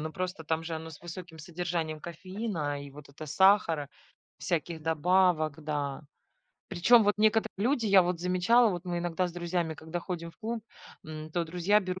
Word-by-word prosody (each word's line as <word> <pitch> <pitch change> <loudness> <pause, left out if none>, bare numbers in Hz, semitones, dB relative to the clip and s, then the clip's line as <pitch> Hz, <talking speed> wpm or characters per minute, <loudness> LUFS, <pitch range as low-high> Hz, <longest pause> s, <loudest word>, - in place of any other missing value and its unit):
но 155 +1 -4
просто 180 -1 -4
там 160 +1 -1
же 165 - -4
оно 160 0 -6
с 150 - -12
высоким 175 -1 -9
содержанием 165 -1 -3
кофеина, 170 -4 -4
и 140 - -10
вот 145 +1 -13
это 145 +2 -10
сахара, 165 -3 +4 0.5
всяких 170 -2 -2
добавок, 160 -1 +2
да. 145 -2 -3 0.7
Причем, 205 +6 +5
вот 205 0 +3
некоторые 220 +1 +3
люди, 235 +2 +1
я 195 -2 +7
вот 175 -1 -2
замечала, 185 +6 +4
вот 175 -1 -4
мы 175 -1 -2
иногда 175 +1 -1
с 175 - -7
друзьями, 175 -1 -2
когда 160 +3 -5
ходим 170 -2 -5
в - - -26
клуб, 225 0 -4 0.4
м, 155 0 -7
то 175 0 0
друзья 180 +5 +2
берут 185 -1 -4
175 Hz, 180 wpm, -29 LUFS, 160-185 Hz, 0.7 s, я